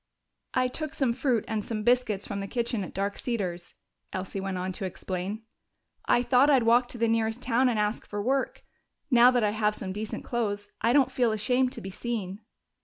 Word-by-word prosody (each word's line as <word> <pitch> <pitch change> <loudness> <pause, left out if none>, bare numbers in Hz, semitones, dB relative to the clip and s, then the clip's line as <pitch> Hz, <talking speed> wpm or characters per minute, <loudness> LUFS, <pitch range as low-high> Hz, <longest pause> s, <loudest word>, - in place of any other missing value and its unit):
"I 255 -1 +3
took 310 +4 -5
some 260 -4 +1
fruit 250 -3 0
and 220 -2 -2
some 215 -1 -3
biscuits 240 -4 +2
from 200 - -4
the 195 - -4
kitchen 235 -1 -1
at - - -7
Dark 200 +1 -2
Cedars," 185 -8 -3 0.4
Elsie 190 +1 -4
went 190 -1 -3
on 185 +1 -2
to 185 - -6
explain. 190 +3 -4 0.6
"I 245 - +3
thought 260 +3 +4
I'd 265 -4 +5
walk 240 +2 +4
to 245 - -8
the 230 0 +2
nearest 225 +1 0
town 250 +2 +3
and 235 - 0
ask 210 +1 -1
for 205 - -4
work. 260 +5 -1 0.5
Now 245 0 +8
that 245 -2 +2
I 210 - +2
have 210 0 +1
some 190 -2 -4
decent 210 +2 -5
clothes, 205 -4 -2
I 230 +2 +3
don't 275 0 +4
feel 240 -3 +2
ashamed 250 +4 +1
to - - -7
be 195 - -6
seen." 205 -3 -4
225 Hz, 205 wpm, -28 LUFS, 205-245 Hz, 0.6 s, Now